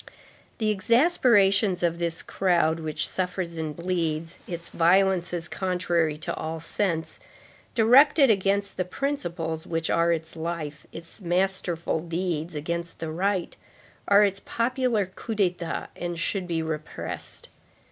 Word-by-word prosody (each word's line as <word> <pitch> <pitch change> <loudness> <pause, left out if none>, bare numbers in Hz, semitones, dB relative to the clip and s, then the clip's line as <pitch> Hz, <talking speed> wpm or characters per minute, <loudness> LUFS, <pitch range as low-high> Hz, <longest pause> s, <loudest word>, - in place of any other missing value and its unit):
The 215 -2 +1
exasperations 210 - +3
of 170 0 +1
this 170 -1 -2
crowd 170 -4 +1
which 155 -1 -2
suffers 180 -2 -3
and 155 -2 -4
bleeds, 165 -2 -2
its 170 -1 -5
violences 175 -1 +2
contrary 175 -4 0
to 155 - -3
all 160 +1 -4
sense, 165 0 -2 0.6
directed 270 +4 +6
against 200 0 0
the 185 - +1
principles 175 - -3
which 165 -1 -1
are 170 0 +3
its 160 0 -3
life, 160 -2 -5
its 165 +5 -10
masterful 175 -2 0
deeds 170 -1 -3
against 170 +3 -3
the 160 -1 -4
right, 185 +2 -1 0.5
are 200 +1 +7
its 195 -1 +1
popular 235 -2 0
coups 215 +4 -7
d'état 175 -3 -1
and 175 -1 -4
should 185 +1 -2
be 165 -2 -1
repressed. 155 -1 -5
175 Hz, 125 wpm, -26 LUFS, 165-195 Hz, 0.6 s, are